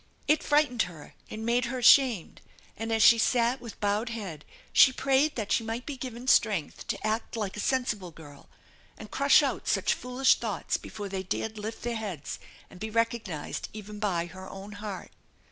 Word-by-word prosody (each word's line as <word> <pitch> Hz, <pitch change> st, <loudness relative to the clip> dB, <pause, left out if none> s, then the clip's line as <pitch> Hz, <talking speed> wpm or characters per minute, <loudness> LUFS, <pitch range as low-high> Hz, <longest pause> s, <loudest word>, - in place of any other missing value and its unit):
It 305 Hz, +1 st, +3 dB
frightened 290 Hz, -5 st, +2 dB
her 155 Hz, -4 st, -13 dB, 0.2 s
and 220 Hz, +1 st, -6 dB
made 240 Hz, +2 st, +2 dB
her 250 Hz, +2 st, -3 dB
ashamed, 245 Hz, -, +4 dB, 0.3 s
and 225 Hz, +1 st, -4 dB
as 225 Hz, -1 st, +3 dB
she 230 Hz, -, +8 dB
sat 240 Hz, +2 st, +2 dB
with 235 Hz, -3 st, -10 dB
bowed 210 Hz, +3 st, 0 dB
head 195 Hz, -10 st, -6 dB, 0.3 s
she 260 Hz, -, +8 dB
prayed 275 Hz, +3 st, +2 dB
that 215 Hz, -4 st, -4 dB
she 230 Hz, -, +2 dB
might 225 Hz, +3 st, -4 dB
be 290 Hz, -, -5 dB
given 250 Hz, -1 st, -7 dB
strength 205 Hz, -, +2 dB
to -, -, -3 dB
act 220 Hz, +2 st, -2 dB
like 205 Hz, -3 st, -3 dB
a -, -, -6 dB
sensible 215 Hz, -7 st, -1 dB
girl, 155 Hz, -3 st, -14 dB, 0.5 s
and -, -, -11 dB
crush -, -, +5 dB
out -, -, -2 dB
such -, -, +2 dB
foolish 250 Hz, +2 st, +2 dB
thoughts -, -, -2 dB
before 205 Hz, -1 st, -7 dB
they 190 Hz, -1 st, -3 dB
dared 215 Hz, +3 st, -3 dB
lift 220 Hz, +2 st, -6 dB
their 235 Hz, -1 st, -2 dB
heads 190 Hz, -10 st, -5 dB, 0.3 s
and 180 Hz, -, -15 dB
be 220 Hz, +2 st, -4 dB
recognized 230 Hz, -7 st, -2 dB
even 210 Hz, 0 st, -8 dB
by 180 Hz, -5 st, 0 dB
her 190 Hz, +2 st, -10 dB
own 195 Hz, +2 st, -9 dB
heart. 205 Hz, -2 st, -7 dB
220 Hz, 185 wpm, -28 LUFS, 200-245 Hz, 0.5 s, she